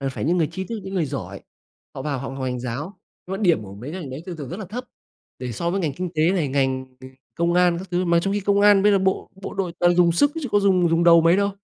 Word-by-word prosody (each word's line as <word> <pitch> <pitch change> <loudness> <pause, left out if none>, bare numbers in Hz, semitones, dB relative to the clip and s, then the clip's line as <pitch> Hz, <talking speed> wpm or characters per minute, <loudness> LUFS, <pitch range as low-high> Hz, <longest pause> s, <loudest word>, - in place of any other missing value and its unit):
Là 135 - -2
phải 130 - -5
những 170 +5 +2
người 160 - +2
tri 190 +2 -4
thức, 230 0 -5
những 190 - -6
người 180 -4 +1
giỏi, 100 -10 -6 0.5
họ 135 - -6
vào 140 -2 -2
họ 135 - -5
học 135 0 -7
ngành 125 -1 -3
giáo, 145 - -5 0.3
nhưng 190 +1 -3
mà 205 - -6
điểm 170 - +3
của 100 -1 -10
mấy 120 +8 -8
cái 185 - -5
ngành 140 -6 -7
đấy 135 +4 -7
thường 180 -2 -6
thường 145 -4 -7
rất 175 - -6
là - - -5
thấp 240 +7 -6 0.5
để 125 -1 -5
so 170 +10 -2
với 195 +2 -1
ngành 160 -5 -1
kinh 180 +2 -4
tế 155 +2 +3
này, 170 -7 0
ngành 130 -1 0
ng 130 0 -12 0.2
công 170 +1 0
an 180 -1 +3
các 185 +1 -8
thứ, 180 +1 0
mà 170 -1 +3
trong 195 +3 -1
khi 205 - 0
công 200 +1 +2
an 205 -1 +6
bây 205 +1 +5
giờ 200 - +4
bộ 190 0 -1
bộ - - -6
đội 190 -3 -2
toàn 175 0 +4
dùng 175 -1 +5
sức 285 - +3
chứ 270 - -3
có 205 - +4
dùng 185 -3 +3
dùng 165 +1 +2
đầu 170 -1 +7
mấy 165 +2 +4
đâu. 200 0 +1
170 Hz, 315 wpm, -23 LUFS, 140-190 Hz, 0.5 s, đầu